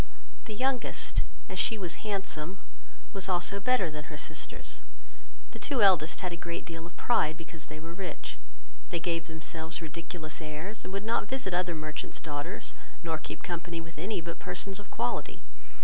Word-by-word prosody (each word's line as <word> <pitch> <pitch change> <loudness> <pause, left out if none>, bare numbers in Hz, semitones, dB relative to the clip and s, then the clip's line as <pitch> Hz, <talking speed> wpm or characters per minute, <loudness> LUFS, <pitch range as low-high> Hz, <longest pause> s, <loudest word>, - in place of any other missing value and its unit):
The 215 - -3
youngest, 260 +2 +3 0.3
as - - -2
she 225 - +5
was 180 -4 -2
handsome, 195 -4 0 0.5
was 195 -1 +1
also 185 +2 +3
better 200 -6 +4
than 150 0 -4
her 150 +1 -6
sisters. - - -4 0.7
The - - -7
two 260 -7 +4
eldest 175 -5 +7
had 180 -2 0
a - - -2
great 170 0 -2
deal 165 0 -4
of 175 - -14
pride, 160 -9 +4
because 165 -1 -6
they 155 0 -5
were 165 +2 -5
rich. 180 -2 -3 0.5
They 170 - +2
gave 165 0 +1
themselves 160 0 -3
ridiculous 165 0 -4
airs, 160 +8 -3
and - - -4
would 200 +2 -1
not 225 -2 +3
visit 255 -8 +1
other 175 -1 +3
merchants' 155 -1 -2
daughters, 150 +4 -2 0.3
nor 160 -2 +1
keep - - -5
company 175 -1 -1
with 165 -1 -7
any 190 +2 +1
but 170 +1 -4
persons 195 0 -1
of 205 - -9
quality. - - 0
170 Hz, 175 wpm, -32 LUFS, 160-195 Hz, 0.7 s, eldest